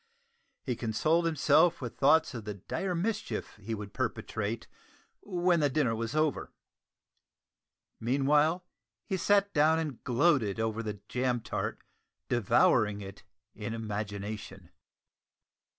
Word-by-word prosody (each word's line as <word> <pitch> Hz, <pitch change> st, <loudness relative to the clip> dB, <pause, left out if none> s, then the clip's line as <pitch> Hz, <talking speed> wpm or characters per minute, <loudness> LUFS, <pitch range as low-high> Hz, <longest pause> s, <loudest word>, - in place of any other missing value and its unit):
He 125 Hz, -, -2 dB
consoled 155 Hz, +10 st, +1 dB
himself 160 Hz, +1 st, +4 dB
with 120 Hz, -3 st, -6 dB
thoughts 150 Hz, +2 st, +4 dB
of 115 Hz, -3 st, -6 dB
the 105 Hz, -1 st, -5 dB
dire 180 Hz, -, -3 dB
mischief 215 Hz, +5 st, -3 dB
he 110 Hz, +2 st, -4 dB
would 105 Hz, -1 st, -8 dB
perpetrate 110 Hz, +2 st, -3 dB, 0.6 s
when 180 Hz, -3 st, +1 dB
the 145 Hz, -2 st, +3 dB
dinner 130 Hz, -5 st, +1 dB
was 115 Hz, +5 st, -3 dB
over. 155 Hz, -2 st, 0 dB, 1.5 s
Meanwhile, 145 Hz, +8 st, +2 dB, 0.4 s
he 195 Hz, -, -1 dB
sat 200 Hz, +2 st, +2 dB
down 155 Hz, +1 st, +4 dB
and 150 Hz, -6 st, -4 dB
gloated 125 Hz, -, +2 dB
over 110 Hz, 0 st, -1 dB
the 105 Hz, -2 st, -5 dB
jam 125 Hz, -1 st, 0 dB
tart, -, -, -4 dB, 0.5 s
devouring 105 Hz, -2 st, +3 dB
it 95 Hz, -1 st, -9 dB, 0.3 s
in 110 Hz, +1 st, -5 dB
imagination. 105 Hz, -1 st, -5 dB
125 Hz, 120 wpm, -30 LUFS, 110-160 Hz, 1.5 s, himself